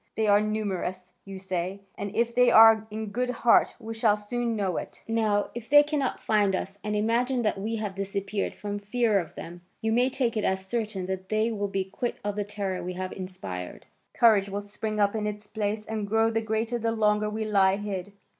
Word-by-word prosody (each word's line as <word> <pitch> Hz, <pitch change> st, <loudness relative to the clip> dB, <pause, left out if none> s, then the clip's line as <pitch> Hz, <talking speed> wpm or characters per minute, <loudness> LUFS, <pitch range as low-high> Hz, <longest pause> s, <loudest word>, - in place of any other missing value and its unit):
They 220 Hz, -, +1 dB
are 205 Hz, 0 st, +5 dB
numerous, 195 Hz, -4 st, -3 dB
you 195 Hz, -1 st, -7 dB
say, 190 Hz, +1 st, -3 dB
and 200 Hz, 0 st, -5 dB
if 235 Hz, 0 st, +1 dB
they 250 Hz, 0 st, +5 dB
are 225 Hz, -1 st, +7 dB
in 215 Hz, 0 st, -5 dB
good 250 Hz, +4 st, -1 dB
heart, 240 Hz, -1 st, +3 dB
we 225 Hz, -1 st, -6 dB
shall 220 Hz, -2 st, +2 dB
soon 235 Hz, +2 st, -2 dB
know 195 Hz, -4 st, -1 dB
it. -, -, -7 dB
Now, 215 Hz, -2 st, +1 dB
if 230 Hz, -1 st, -8 dB
they 290 Hz, +1 st, +8 dB
cannot 290 Hz, -3 st, -1 dB
find 205 Hz, -3 st, +2 dB
us 195 Hz, +2 st, -5 dB
and 210 Hz, 0 st, -2 dB
imagine 240 Hz, +4 st, +1 dB
that 210 Hz, -2 st, 0 dB
we 220 Hz, +3 st, -2 dB
have 210 Hz, -3 st, -3 dB
disappeared 195 Hz, +1 st, -3 dB
from 205 Hz, 0 st, -4 dB
fear 210 Hz, 0 st, +1 dB
of 170 Hz, -, -7 dB
them, 175 Hz, +1 st, -8 dB, 0.2 s
you 220 Hz, -, -1 dB
may 245 Hz, +3 st, +3 dB
take 250 Hz, -3 st, -1 dB
it 215 Hz, -, 0 dB
as 190 Hz, 0 st, 0 dB
certain 210 Hz, -3 st, -3 dB
that 190 Hz, 0 st, -5 dB
they 215 Hz, +2 st, +1 dB
will 205 Hz, -2 st, -2 dB
be 195 Hz, -1 st, -1 dB
quit 235 Hz, +6 st, -4 dB
of 205 Hz, 0 st, -2 dB
the 205 Hz, -, -1 dB
terror 200 Hz, -2 st, -4 dB
we 180 Hz, +1 st, -4 dB
have 185 Hz, +1 st, -4 dB
inspired. 95 Hz, -, -7 dB, 0.3 s
Courage 210 Hz, -4 st, +5 dB
will 200 Hz, +1 st, -3 dB
spring 210 Hz, +1 st, -4 dB
up 205 Hz, +1 st, +2 dB
in 210 Hz, -1 st, -1 dB
its 210 Hz, 0 st, -5 dB
place, 210 Hz, 0 st, -3 dB
and 215 Hz, -2 st, -3 dB
grow 225 Hz, +2 st, +2 dB
the 225 Hz, 0 st, 0 dB
greater 220 Hz, +2 st, -1 dB
the 230 Hz, 0 st, 0 dB
longer 210 Hz, -1 st, +2 dB
we 220 Hz, +1 st, -3 dB
lie 195 Hz, -2 st, +4 dB
hid. 200 Hz, -2 st, -5 dB
210 Hz, 215 wpm, -27 LUFS, 195-225 Hz, 0.3 s, they